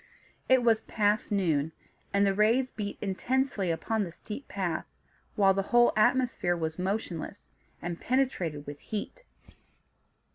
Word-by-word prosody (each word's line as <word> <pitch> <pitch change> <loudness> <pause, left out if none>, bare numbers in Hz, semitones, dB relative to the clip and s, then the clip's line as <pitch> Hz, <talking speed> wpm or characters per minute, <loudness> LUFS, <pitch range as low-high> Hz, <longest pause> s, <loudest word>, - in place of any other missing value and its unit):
It 260 -1 +5
was 225 -2 +4
past 210 0 0
noon, 160 -6 +1 0.4
and 200 0 +3
the 195 - +3
rays 230 +6 +3
beat 205 -2 -5
intensely 210 0 0
upon 210 +6 0
the 175 - -5
steep 215 +10 -8
path, 185 -5 -2 0.5
while 195 -3 +5
the 195 - +1
whole 240 0 +5
atmosphere 215 -6 +2
was 160 0 -3
motionless, 190 -1 -3 0.4
and 175 0 -4
penetrated 185 - 0
with 145 0 -8
heat. 220 - -6
205 Hz, 135 wpm, -29 LUFS, 175-230 Hz, 0.5 s, It